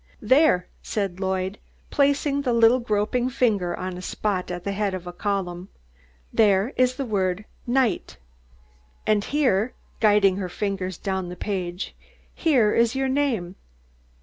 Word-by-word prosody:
"There," 260 - +4 0.2
said 195 -4 -3
Lloyd, 190 +1 -2 0.3
placing 280 0 +2
the 255 -4 0
little 230 +2 +5
groping 235 +2 0
finger 205 -9 +1
on 185 -1 -4
a - - -7
spot 185 0 -2
at 175 0 -5
the 200 - -2
head 200 -1 -1
of 180 -1 -7
a 175 - -7
column. 185 -2 -3 0.6
"There 205 +2 +3
is 255 0 +2
the 275 - -3
word 195 -2 -1 0.2
NIGHT, 255 -1 0 0.9
and 210 -1 +2
heah," 255 -6 +1 0.3
guiding 205 -3 +4
her 185 -2 -3
fingers 190 -2 -3
down 190 -2 -3
the 180 - -6
page, 180 -2 -4 0.4
"heah 255 -11 +3
is 235 +2 +2
yo' 270 0 0
name. 260 -10 0
205 Hz, 145 wpm, -24 LUFS, 185-245 Hz, 0.9 s, little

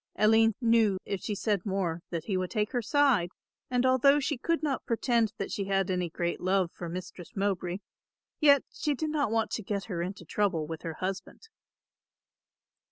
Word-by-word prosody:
Aline 220 0 +4
knew, 225 -4 +4
if 195 - -3
she 210 - -3
said 200 -2 0
more 185 -4 -1
that 165 -2 -3
he 195 +2 -2
would 185 -1 -1
take 210 -2 -1
her 245 - 0
side, 255 - +3 0.4
and 250 0 +1
although 260 +3 +5
she 295 +1 -1
could 325 +5 -1
not 280 -3 -1
pretend 230 -1 +1
that 195 - -4
she 200 - -2
had 195 -1 +1
any 180 -2 -1
great 170 +1 -2
love 185 -1 +1
for 175 - -6
Mistress 180 0 -8
Mowbray, 190 -3 -1 0.6
yet 285 -3 +6
she 295 -2 -1
did 310 +3 -2
not 290 -6 +1
want 225 0 0
to - - -2
get 200 -1 -3
her 175 -5 -4
into 180 0 -5
trouble 185 -3 0
with 160 0 -6
her 165 -2 -5
husband. 190 - -5
200 Hz, 185 wpm, -29 LUFS, 185-245 Hz, 0.6 s, yet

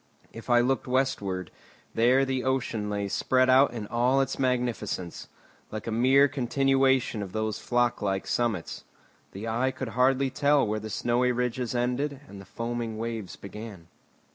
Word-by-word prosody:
If 115 +2 -10
I 120 0 +5
looked 130 +2 0
westward, 105 -8 -1 0.4
there 125 +4 +4
the 130 -1 -2
ocean 120 -5 -1
lay 100 -1 -2
spread 130 +5 +2
out 135 +1 +5
in 115 -3 -5
all 120 +5 +2
its 135 -1 -1
magnificence, 120 -9 -2 0.4
like 110 - -6
a 115 - -3
mere 130 +5 +5
continuation 135 -2 +1
of 95 -2 -7
those 110 -1 -2
flock 120 -1 0
like 95 -1 -1
summits. 115 -8 -2 0.5
The 100 +4 -6
eye 120 +4 +1
could 130 -2 -5
hardly 130 +3 +2
tell 140 +1 +3
where 110 0 -1
the 110 +1 -7
snowy 120 +3 +1
ridges 125 0 -2
ended 130 +4 -1
and 100 -1 -10
the - - -13
foaming 115 +2 -4
waves 115 -3 -5
began. 100 -3 -10
120 Hz, 160 wpm, -27 LUFS, 110-130 Hz, 0.5 s, I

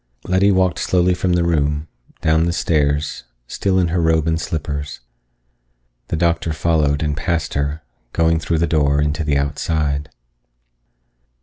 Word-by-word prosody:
Letty 95 +2 +2
walked 95 -1 +2
slowly 90 0 +2
from 90 0 0
the 90 -1 +2
room, 75 -2 0 0.3
down 80 +1 +3
the 85 - 0
stairs, 75 -3 0 0.2
still 95 +7 0
in 90 -2 +2
her 85 +1 0
robe 80 -1 +2
and 80 0 0
slippers. 75 -2 -4 1.1
The - - -2
doctor 85 -1 0
followed 75 -2 +1
and 75 -1 -1
passed 80 0 -2
her, 70 +2 -2 0.3
going 80 +2 +2
through 80 +1 -1
the 85 - +2
door 75 -3 +2
into 75 +2 0
the 75 -2 +1
outside. 75 0 -1
80 Hz, 145 wpm, -19 LUFS, 75-85 Hz, 1.1 s, down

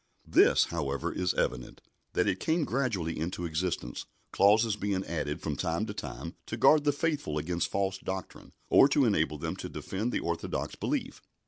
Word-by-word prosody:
This, - - +5
however, 70 -5 -2
is 90 -1 0
evident, 65 -1 -2 0.3
that - - +2
it 95 - 0
came 160 - +1
gradually 110 - -1
into 85 +2 -3
existence, 80 -6 -3 0.2
clauses 105 +2 +4
being 100 -2 -2
added 75 -2 -3
from 75 - -2
time 85 +9 -1
to 105 - -5
time 100 - -6
to - - -4
guard 150 -1 +5
the 145 - +5
faithful 145 - -1
against 85 +3 -1
false 95 -1 -1
doctrine, 95 0 -6 0.2
or - - +7
to 140 -1 +3
enable 80 -8 +1
them - - -3
to - - -6
defend 105 +6 -3
the - - 0
orthodox 85 -1 -3
belief. - - -3
95 Hz, 175 wpm, -30 LUFS, 80-110 Hz, 0.3 s, or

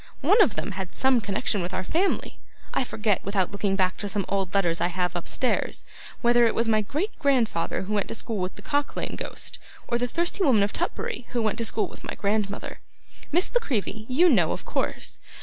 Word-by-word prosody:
One 430 +2 +6
of 235 - +4
them - - -3
had 190 -1 -5
some 260 -2 +3
connection 205 0 -1
with 180 +2 -3
our 185 - -1
family. 350 - 0 0.3
I - - +2
forget, 215 -4 0
without 195 -2 0
looking 200 -1 0
back 185 -1 +1
to 205 - -4
some 195 -1 -1
old 195 -2 -1
letters 175 -4 +2
I - - +3
have 180 0 -1
upstairs, 210 +8 0 0.4
whether 240 -1 +5
it - - 0
was 230 - +1
my 215 -1 +3
great 300 - -2
grandfather 245 - +1
who 205 +3 -3
went 205 -2 +1
to - - -3
school 225 -2 -2
with 185 0 -2
the 205 - -13
Cock 285 -1 0
lane - - -3
Ghost, - - -5 0.3
or 235 - 0
the 245 - +1
Thirsty 345 +8 0
Woman 235 - +5
of 200 - -1
Tutbury 240 - -3
who 240 - +1
went 215 +1 0
to 230 - +1
school 220 - +1
with - - -13
my - - -5
grandmother. 205 0 -1 0.5
Miss 350 +9 +2
La - - +5
Creevy, 220 - -3
you 315 +8 +5
know, 195 - +4
of - - -4
course. - - -3
215 Hz, 220 wpm, -26 LUFS, 195-250 Hz, 0.5 s, One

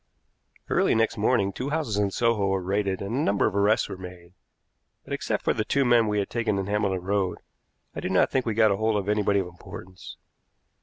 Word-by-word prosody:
Early - - +2
next 115 0 +1
morning 105 -2 +1
two 130 +7 -4
houses 150 -8 -1
in 100 -1 +1
Soho 110 -1 +1
were 95 0 +1
raided 100 0 -1
and 100 +3 -4
a - - 0
number 100 -9 +1
of 105 - -1
arrests 100 +2 +2
made; 90 -1 -10 0.7
but, - - -7
except - - -2
for - - +2
the 110 - -1
two 140 +5 +1
men 120 -2 +4
we 105 0 0
had 100 - 0
taken 115 -4 0
in 95 - -2
Hambledon 100 -3 -1
Road, 100 -2 0 0.6
I - - -5
do - - -3
not - - +3
think 130 - +1
we 110 - -1
got 110 -3 +4
hold 110 +1 0
of 100 -1 -3
anybody 105 -1 +2
of - - -5
importance. 90 +1 -11
105 Hz, 210 wpm, -26 LUFS, 95-110 Hz, 0.7 s, men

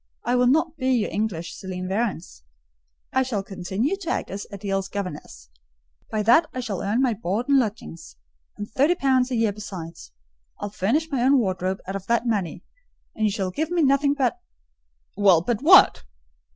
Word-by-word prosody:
I 245 - +1
will 250 0 +3
not 320 +4 +2
be 260 -2 -1
your 230 -4 0
English 200 -5 -3
Céline 185 -1 -6
Varens. 190 - -3 0.7
I 260 - +3
shall 235 -7 -2
continue 195 - -2
to 365 -4 -6
act - - -2
as 200 +1 -6
Adèle's 195 -1 -3
governess; 150 - -7 0.6
by 215 -1 -1
that 245 +9 +5
I - - -2
shall 210 -7 -4
earn 225 +6 0
my 250 -3 +2
board 215 +3 -3
and 280 -1 +5
lodging, 220 -7 -3 0.6
and 205 - -5
thirty 290 +8 +2
pounds 260 -5 +2
a 255 - -2
year 225 -3 +1
besides. 175 - -9 0.5
I'll 205 - -5
furnish 280 - 0
my 265 -4 0
own 270 +3 +4
wardrobe 190 -4 -1
out 195 - -5
of 195 -1 -6
that 235 +1 +1
money, 195 -8 -2 0.5
and 220 - -1
you 210 - +2
shall 195 -3 -2
give 315 - -2
me 345 -2 +1
nothing 280 +1 +3
but—" 275 +5 0 0.8
"Well, 190 -5 +4
but 230 +3 -1
what?" 355 - +7
215 Hz, 180 wpm, -24 LUFS, 195-260 Hz, 0.8 s, what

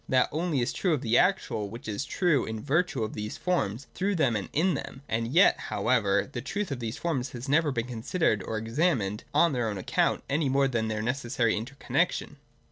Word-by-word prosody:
That 130 -1 +3
only 155 -3 0
is 120 - -1
true 180 -5 +1
of 135 - -5
the 115 +1 +3
actual 180 - +1
which 115 +3 -9
is 110 +6 -2
true 165 -9 +2
in 110 0 -4
virtue 160 -3 +1
of 110 - -4
these 105 0 -5
forms, 140 - -1
through 195 +2 0
them 135 -9 +2
and 100 - -3
in 175 +5 +2
them. 135 -1 -6
As 115 +1 -1
yet, 165 +12 +4
however, 100 -5 +2
the 120 - -4
truth 190 +7 -3
of 135 - -3
these 115 -1 -4
forms 135 -7 -2
has 120 +2 -6
never 150 +2 +3
been 115 -3 -1
considered 120 - 0
or 110 +4 -3
examined 115 - 0
on 170 -3 +4
their 120 -3 0
own 105 - -4
account 95 - 0
any 145 0 +1
more 135 +1 +3
than 115 -4 -1
their 110 0 -2
necessary 120 -1 0
interconnexion. 130 +6 -1
125 Hz, 210 wpm, -28 LUFS, 110-155 Hz, -, yet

